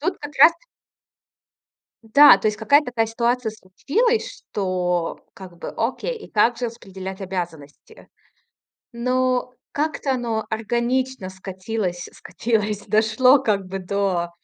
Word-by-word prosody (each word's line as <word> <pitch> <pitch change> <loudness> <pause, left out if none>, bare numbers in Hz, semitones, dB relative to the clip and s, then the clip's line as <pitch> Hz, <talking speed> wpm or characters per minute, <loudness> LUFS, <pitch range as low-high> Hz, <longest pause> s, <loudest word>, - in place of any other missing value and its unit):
Тут 360 +5 -2
как 290 0 -9
раз 335 - +8
т 335 +9 -27 1.4
Да, 255 +1 +8
то 215 - -1
есть 210 0 -1
какая-то 285 +7 +3
такая 235 -2 0
ситуация 235 +1 -1
случилась, 330 - -1
что 180 -3 -1 0.2
как 185 -3 -12
бы, - - -6
окей, 265 - -2
и 435 - -13
как 230 +3 +3
же 245 - -2
распределять 190 -4 -8
обязанности? 170 -6 -7 0.9
Ну, 255 +1 0 0.2
как-то 295 -2 -1
оно 230 -3 -2
органично 240 0 -1
скатилось 190 -1 -4
скатилось, 210 -3 -2
дошло 225 +5 +4
как 210 -7 0
бы 195 +1 -5
до 185 -2 -1
220 Hz, 125 wpm, -22 LUFS, 190-255 Hz, 1.4 s, раз